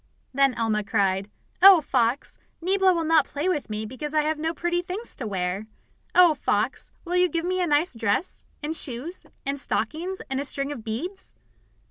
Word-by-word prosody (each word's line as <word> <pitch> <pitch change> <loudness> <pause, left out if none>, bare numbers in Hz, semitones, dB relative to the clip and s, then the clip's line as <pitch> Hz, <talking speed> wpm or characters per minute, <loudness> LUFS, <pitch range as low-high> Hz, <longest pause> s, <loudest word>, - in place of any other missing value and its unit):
Then 275 -1 +3
Alma 220 -2 0
cried: 195 -1 0 0.3
"Oh, 385 -2 +10
Fox, 255 -3 -1 0.2
Niebla 380 +2 +3
will 335 -2 0
not 315 -3 +3
play 295 +5 -3
with 310 -10 -1
me 215 0 -4
because 295 +7 -6
I 305 - +3
have 310 0 -1
no 320 +1 -1
pretty 345 +1 -1
things 370 +6 +2
to 240 - -4
wear! 190 +1 -3 0.5
Oh, 355 -3 +7
Fox, 225 -4 0
will 350 +1 -2
you 360 0 +4
give 335 0 -2
me 370 +1 0
a 355 - +1
nice 295 +2 +2
dress, 230 - -1 0.2
and 310 +2 -2
shoes 285 +6 -5 0.2
and 280 +1 -2
stockings, 350 +7 -2
and 270 -1 -2
a - - -1
string 275 0 -1
of 255 -6 -7
beads?" 280 - -5
295 Hz, 185 wpm, -25 LUFS, 230-350 Hz, 0.5 s, Oh